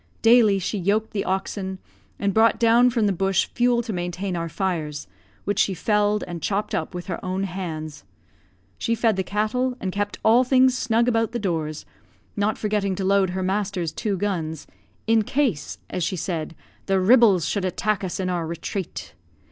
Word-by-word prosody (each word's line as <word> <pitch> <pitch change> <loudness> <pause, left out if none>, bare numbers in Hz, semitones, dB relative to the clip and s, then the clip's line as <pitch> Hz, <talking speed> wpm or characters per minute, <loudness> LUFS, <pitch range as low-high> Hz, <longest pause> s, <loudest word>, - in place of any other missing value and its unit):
Daily 225 -3 +6
she 195 +2 -2
yoked 205 +4 0
the 200 - -2
oxen, 190 0 -2 0.4
and 200 -1 0
brought 225 +2 +4
down 235 +1 +5
from 230 -3 +1
the 200 - +2
bush 195 +1 +1
fuel 240 0 +2
to 225 -2 -4
maintain 180 +1 -3
our 170 -1 -3
fires, 160 -5 -3 0.4
which 205 +1 -1
she 195 -3 +2
felled 210 +2 +1
and 175 -2 -6
chopped 205 +1 -1
up 160 +3 -2
with 175 - -5
her 180 - -5
own 185 +1 -2
hands. 165 -5 -5 0.8
She 230 - 0
fed 225 -2 +2
the 190 - 0
cattle, 220 +6 -1
and 190 - -3
kept 205 +1 -2
all 230 +3 +6
things 255 0 +4
snug 235 -2 +1
about 225 -1 +1
the - - 0
doors; 160 -7 -3 0.5
not 205 +1 0
forgetting 205 -2 -1
to 190 - -3
load 195 -1 +3
her 185 - -1
master's 190 -3 -1
two 200 +2 -2
guns, 165 -6 -3 0.4
"in 225 0 +4
case," 215 - -1
as 180 - -3
she 175 - -1
said, 165 -2 -4 0.3
"the 195 -1 +2
ribels 200 -3 +5
should 200 - -1
attack 195 +3 -1
us 185 +1 -3
in 185 - -1
our 175 -3 -1
retrate." 170 - -5
195 Hz, 180 wpm, -23 LUFS, 180-220 Hz, 0.8 s, Daily